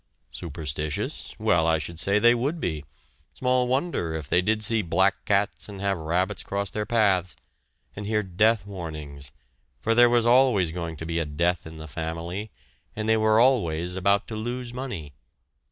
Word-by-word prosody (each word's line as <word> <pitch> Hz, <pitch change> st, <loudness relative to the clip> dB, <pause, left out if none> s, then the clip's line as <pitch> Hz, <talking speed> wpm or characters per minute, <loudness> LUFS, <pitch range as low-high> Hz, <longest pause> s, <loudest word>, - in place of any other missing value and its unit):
Superstitious? 75 Hz, -2 st, -4 dB
Well, 80 Hz, -2 st, +2 dB
I 80 Hz, 0 st, +3 dB
should 80 Hz, +2 st, -5 dB
say 100 Hz, +2 st, +3 dB
they 120 Hz, +3 st, +6 dB
would 140 Hz, +8 st, -1 dB
be 80 Hz, -, -3 dB, 0.5 s
small 125 Hz, -1 st, +1 dB
wonder 130 Hz, -, -1 dB
if 75 Hz, -3 st, -5 dB
they 90 Hz, -, +3 dB
did 110 Hz, +3 st, +1 dB
see 110 Hz, +1 st, +3 dB
black 95 Hz, +2 st, +1 dB
cats 100 Hz, +1 st, 0 dB
and 100 Hz, -1 st, -8 dB
have 100 Hz, 0 st, 0 dB
rabbits 85 Hz, +4 st, -1 dB
cross 100 Hz, 0 st, -3 dB
their 105 Hz, -1 st, -3 dB
paths, 95 Hz, -7 st, +2 dB, 0.6 s
and 105 Hz, 0 st, -6 dB
hear 105 Hz, 0 st, +1 dB
death 100 Hz, +3 st, +2 dB
warnings, 75 Hz, -8 st, -7 dB, 0.5 s
for 115 Hz, -, +1 dB
there 120 Hz, +1 st, +6 dB
was 120 Hz, -1 st, +3 dB
always 120 Hz, -8 st, +4 dB
going 85 Hz, -2 st, -5 dB
to 80 Hz, -, -6 dB
be 85 Hz, 0 st, -1 dB
a 85 Hz, -, -1 dB
death 85 Hz, +3 st, -1 dB
in 80 Hz, 0 st, -10 dB
the 80 Hz, 0 st, -8 dB
family, 85 Hz, +6 st, -5 dB, 0.5 s
and 110 Hz, 0 st, -3 dB
they 110 Hz, -, +4 dB
were 110 Hz, 0 st, +3 dB
always 90 Hz, -9 st, +2 dB
about 100 Hz, +3 st, +2 dB
to 110 Hz, -, -5 dB
lose 120 Hz, +2 st, -4 dB
money! 120 Hz, -, -6 dB
95 Hz, 175 wpm, -25 LUFS, 80-110 Hz, 0.6 s, they